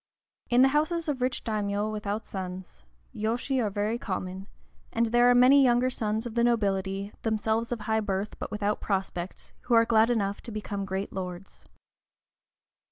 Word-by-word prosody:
In 245 +1 +5
the 270 - +6
houses 315 +4 0
of 280 -4 -2
rich 255 0 -1
daimiōs 210 -1 -1
without 210 0 -3
sons, 185 - -7 0.3
yōshi 240 +4 -1
are 210 - 0
very 210 +3 -1
common, 190 -1 -4 0.4
and 230 +1 +1
there 240 +2 +4
are 245 - +5
many 260 +3 +7
younger 250 0 +3
sons 220 -1 -2
of 235 - -5
the 235 0 +2
nobility, 200 -3 0
themselves 220 +1 0
of 235 -3 -3
high 220 +1 +1
birth, 200 -1 -3
but - - -4
without 210 0 -1
prospects, 190 -2 -3
who 240 - +3
are 230 0 +6
glad 225 0 +4
enough 205 -4 0
to 235 - -8
become 205 -2 -4
great 195 +1 -4
lords. 185 0 -7
215 Hz, 165 wpm, -28 LUFS, 200-240 Hz, 0.4 s, many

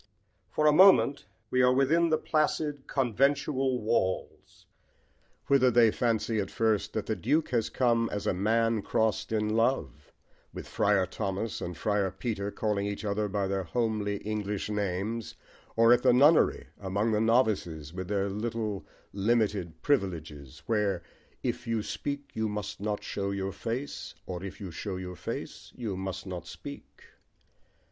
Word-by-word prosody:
For 150 +10 0
a 150 - +7
moment 185 -4 +6 0.3
we 130 - +3
are 125 0 +5
within 155 +6 +3
the 155 - +3
placid 150 -3 -1
conventual 135 +1 +1
walls, 105 -4 -2 0.8
whither 135 -2 +4
they 115 -2 +5
fancy 115 -1 0
at 100 -2 -2
first 110 -5 0
that - - -2
the - - -1
Duke 150 +7 +1
has 115 -3 0
come 115 -2 +2
as 105 - -3
a - - +2
man 115 +3 +1
crossed 110 +2 0
in 105 -1 +1
love, 115 - 0 0.4
with - - -7
Friar 100 -2 +2
Thomas 100 +2 -3
and 85 -1 -5
Friar 100 -2 +1
Peter, 100 +1 -3
calling 105 -1 -1
each 100 +1 -4
other 105 +1 0
by 100 0 -1
their 95 0 -1
homely, 105 +2 -1
English 105 -1 -2
names, 105 +2 -2 0.4
or 115 +1 +6
at 120 - +3
the 125 -1 +5
nunnery 145 +6 +4
among 100 +3 0
the 105 0 +2
novices, 105 - +1
with 90 0 -5
their 100 0 0
little 105 0 -3 0.3
limited 100 -6 0
privileges, 80 - -2
where 100 -4 0 0.4
If 125 0 -3
you 115 -2 0
speak 145 +4 -4
you 110 -1 -1
must 105 -3 -5
not 105 0 -2
show 100 -1 -3
your 100 0 -2
face, 120 +8 -5
Or 90 -1 -5
if 95 -1 -7
you 95 -4 -6
show 95 +4 -5
your 90 -1 -6
face - - -6
you 110 -6 -4
must 95 0 -5
not 90 -2 -6
speak. - - -10
105 Hz, 155 wpm, -29 LUFS, 95-120 Hz, 0.8 s, a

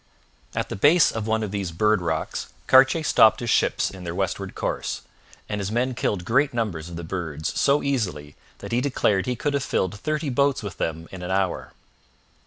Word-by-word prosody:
At - - -2
the - - -4
base 150 - +5
of 110 -1 -4
one 110 0 +1
of 105 - -4
these 100 -4 -3
Bird 105 +4 +2
Rocks 80 -2 -3
Cartier 135 +5 +5
stopped 110 -7 +5
his 120 -2 -1
ships - - +2
in 95 -2 -10
their 85 -1 -5
westward 95 0 -3
course, - - -3 0.5
and 105 -1 -3
his 100 +1 -3
men 125 +3 0
killed 100 -6 -2
great 135 +4 +2
numbers 90 -9 -2
of 85 - -8
the 85 - -6
birds 80 -3 -4
so 140 +1 +3
easily 90 - -2 0.3
that - - -7
he 120 +1 +2
declared 115 -7 +1
he 125 - 0
could 145 +5 -2
have 140 - +1
filled 100 -6 -1
thirty 155 +3 -2
boats 140 -1 +1
with 100 -3 -6
them 80 +1 -3
in 95 - -8
an 90 - -5
hour. 95 -1 -1
105 Hz, 200 wpm, -24 LUFS, 90-130 Hz, 0.5 s, base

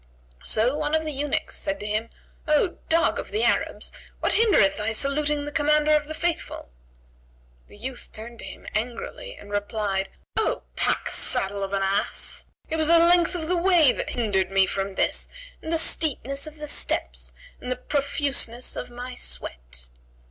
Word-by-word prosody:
So 235 +6 +2
one 300 0 0
of 315 0 0
the 305 - -1
eunuchs 285 0 -1
said 295 0 -1
to - - -6
him, 215 +2 -1 0.4
"O 305 +4 +2
dog 330 +1 +3
of - - -6
the 435 - 0
Arabs, - - +1 0.3
what - - +1
hindereth 380 - +5
thy 215 +1 -1
saluting 290 +4 +1
the 295 - -5
Commander 300 +1 +3
of 300 -1 +3
the 315 - -5
Faithful?" 340 - -2 1.0
The - - -16
youth 250 +3 -6
turned 230 +2 -9
to - - -7
him - - -10
angrily 245 - -4
and 205 - -13
replied, 205 -1 -1 0.3
"O - - +1
packsaddle 200 +1 +1
of 195 0 -3
an 195 -1 +1
ass, 195 +1 0 0.2
it 320 - -2
was 315 -1 +2
the 335 +1 +7
length 345 +1 +5
of 320 -3 -3
the 360 - +1
way 345 -5 +5
that - - -3
hindered 200 -6 0
me 195 0 +4
from 195 0 -3
this - - +1 0.3
and 320 - -5
the 330 - +3
steepness 280 -3 +2
of 310 0 -10
the 300 0 -6
steps - - 0 0.3
and 250 - -5
the - - +1
profuseness 280 -4 0
of - - -5
my 245 +1 -7
sweat." - - -4
275 Hz, 175 wpm, -25 LUFS, 210-310 Hz, 1.0 s, the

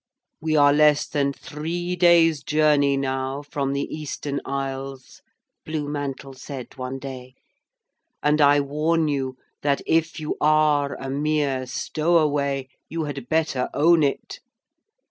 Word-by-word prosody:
'We 155 0 0
are 145 -1 +6
less 150 0 +4
than 140 -1 0
three 170 +5 -4
days' 170 -3 +5
journey 150 -2 +3
now 135 +1 -2
from 140 -1 -2
the 140 0 -1
Eastern 145 -2 -4
Isles,' 135 -1 -5 0.4
Blue 155 -2 -3
Mantle 140 -2 -5
said 130 -1 -9
one 130 0 -5
day, 130 -1 -9 0.9
'and 150 +1 +3
I 145 0 +5
warn 155 +3 0
you 135 -3 -2 0.2
that 140 -1 0
if 165 +1 +1
you 155 0 -3
are 150 -2 +3
a 135 - -6
mere 140 -2 0
stowaway 145 -2 0 0.2
you 165 0 -3
had 140 -4 -6
better 155 -5 0
own 165 +3 +5
it. 140 -2 -2
145 Hz, 130 wpm, -23 LUFS, 135-155 Hz, 0.9 s, are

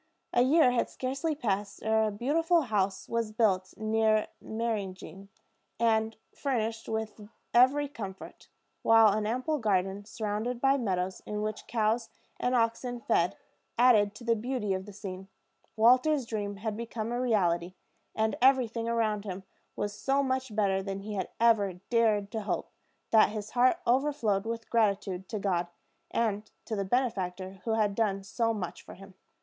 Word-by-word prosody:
A 240 - +4
year 265 +1 +5
had 245 - 0
scarcely 275 +5 -2
passed 205 -6 -2
ere 220 0 +3
a - - -2
beautiful 325 - +2
house 200 -7 -1
was 230 -2 -1
built 195 -4 +1
near 220 0 +2
Meyringen, 200 -4 -4 0.5
and 225 -1 +2 0.2
furnished 225 -5 -2
with 220 -1 -4 0.2
every 265 +4 +5
comfort; 200 -9 -9 0.3
while 225 -1 +6
an 210 0 -1
ample 255 +7 -1
garden, 195 -2 0
surrounded 220 +3 -3
by 270 +2 +4
meadows, 190 -7 -2
in 210 0 -3
which 215 0 -4
cows 225 0 0 0.3
and 250 +1 +1
oxen 240 +1 0
fed, 175 -6 +1 0.4
added 215 -4 +5
to 235 - -11
the 230 0 +2
beauty 230 -3 -2
of 190 +1 -4
the - - -8
scene. 195 -2 -8 0.5
Walter's 255 +5 +4
dream 205 -3 -3
had 210 +1 -4
become 230 0 -4
a 240 +1 -1
reality; 180 -7 +1 0.4
and 220 0 +1
everything 245 -3 +3
around 220 -3 0
him 190 -2 -6 0.3
was 205 0 -3
so 270 +6 +1
much 260 -4 -2
better 195 -3 +2
than 195 0 -5
he 210 +1 -6
had 190 -3 -3
ever 220 -5 +4 0.2
dared 215 -4 +2
to 220 - -3
hope, 205 - -3 0.4
that 220 -1 +6
his 210 0 -6
heart 255 +6 +4
overflowed 240 -6 +1
with 230 0 -4
gratitude 200 -4 0
to 220 - -3
God, 180 -4 0 0.4
and 215 -2 -1 0.2
to 220 - -3
the 200 - -1
benefactor 190 -5 -2
who 225 - 0
had 210 -2 +1
done 200 -2 0
so 230 +4 0
much 205 -6 -5
for - - -12
him. 195 +1 -14
220 Hz, 160 wpm, -29 LUFS, 200-240 Hz, 0.5 s, while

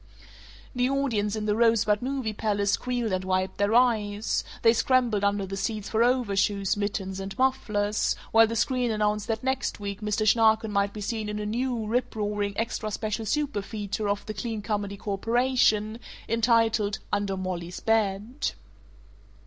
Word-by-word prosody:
The 250 0 +1
audience 230 -7 0
in 215 -1 -3
the 210 -1 +1
Rosebud 225 -2 +3
Movie 255 -4 -2
Palace 205 -1 0
squealed 245 -1 -1
and 185 0 -1
wiped 185 0 -1
their 205 +2 +2
eyes; 215 -4 +2 0.2
they 230 -1 +6
scrambled 240 -4 +2
under 200 -1 +1
the 195 +1 -5
seats 205 +1 -3
for 225 +1 +2
overshoes, 205 -5 +1
mittens, 200 -2 -3
and 195 0 -6
mufflers, 215 -6 +1 0.2
while 225 0 +6
the 230 - -3
screen 250 +1 +1
announced 210 -1 0
that 225 0 -2
next 265 -3 -1
week 200 0 -5
Mr. 210 0 0
Schnarken 220 0 +4
might 200 0 +1
be 210 - -8
seen 215 0 -3
in 210 - -3
a 210 - -3
new, 235 +1 -1
riproaring, 210 -3 -1
extra 225 -1 -2
special 215 +1 -3
superfeature 215 -5 -2
of 205 0 -1
the 215 - -5
Clean 215 0 -4
Comedy 205 -2 -2
Corporation 220 +1 +1 0.3
entitled, 225 -2 +2 0.2
"Under 200 -1 0
Mollie's 180 -2 -4
Bed." 220 +3 0
215 Hz, 155 wpm, -27 LUFS, 205-230 Hz, 0.3 s, they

